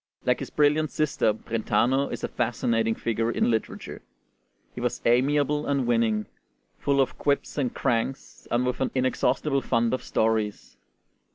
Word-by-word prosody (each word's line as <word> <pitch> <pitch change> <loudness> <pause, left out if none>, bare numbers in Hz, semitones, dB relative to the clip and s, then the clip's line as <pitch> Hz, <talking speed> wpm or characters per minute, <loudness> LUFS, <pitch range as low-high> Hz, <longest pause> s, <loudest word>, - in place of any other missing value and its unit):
Like - - +2
his - - -5
brilliant 150 +1 +2
sister, 150 -8 +1
Brentano 120 +5 0
is - - -5
a - - 0
fascinating 115 -1 0
figure 115 0 -1
in 120 - +1
literature. 110 -1 -4 0.7
He - - -7
was - - -1
amiable 145 +4 +2
and 140 -3 +1
winning, 115 -3 +1 0.5
full 140 -1 +1
of 130 -1 0
quips 140 -1 0
and 135 -5 0
cranks, 120 +3 -2
and 120 +1 +1
with 125 +1 -2
an 130 - +1
inexhaustible 135 +2 +1
fund 115 -2 +1
of 130 - -1
stories. 110 -2 -1
125 Hz, 150 wpm, -26 LUFS, 115-140 Hz, 0.7 s, Like